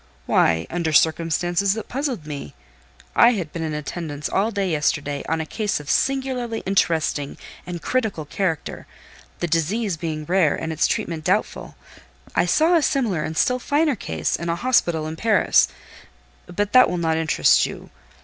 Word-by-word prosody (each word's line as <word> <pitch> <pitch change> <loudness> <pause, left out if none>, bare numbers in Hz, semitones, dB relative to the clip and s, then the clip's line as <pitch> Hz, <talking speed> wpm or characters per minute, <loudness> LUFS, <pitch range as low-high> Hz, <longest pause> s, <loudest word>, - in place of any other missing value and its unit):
"Why, 80 +4 +2
under 170 -2 -1
circumstances 170 +6 +2
that 220 - -6
puzzled 260 - -3
me. 140 - -7 0.6
I 245 - +6
had 175 -8 -4
been 165 - -4
in 155 -2 -3
attendance 150 0 -5
all 205 +3 +1
day 200 -4 -1
yesterday 145 -2 -1
on 165 0 0
a 160 - -2
case 210 +3 -2
of 150 0 -4
singularly 260 -4 -1
interesting 160 -6 0 0.3
and 175 -2 -6
critical 220 -11 -1
character; 165 0 -3 0.5
the 175 - 0
disease 175 +4 0
being 155 -2 -4
rare, 175 -3 +2
and 160 0 -4
its 155 - +2
treatment 160 -2 -2
doubtful: - - -1 0.6
I - - +2
saw 315 - +3
a 330 - +4
similar 240 - 0
and 160 +1 -5
still 250 0 +2
finer 290 +2 +1
case 80 - -2
in 170 0 -4
a 170 - +1
hospital 175 -8 +1
in 160 +1 -5
Paris; 220 -1 +3 0.8
but 200 +4 -2
that 255 0 +7
will 180 - -2
not 160 -2 0
interest 160 -1 +3
you. - - -10
170 Hz, 165 wpm, -22 LUFS, 155-220 Hz, 0.8 s, that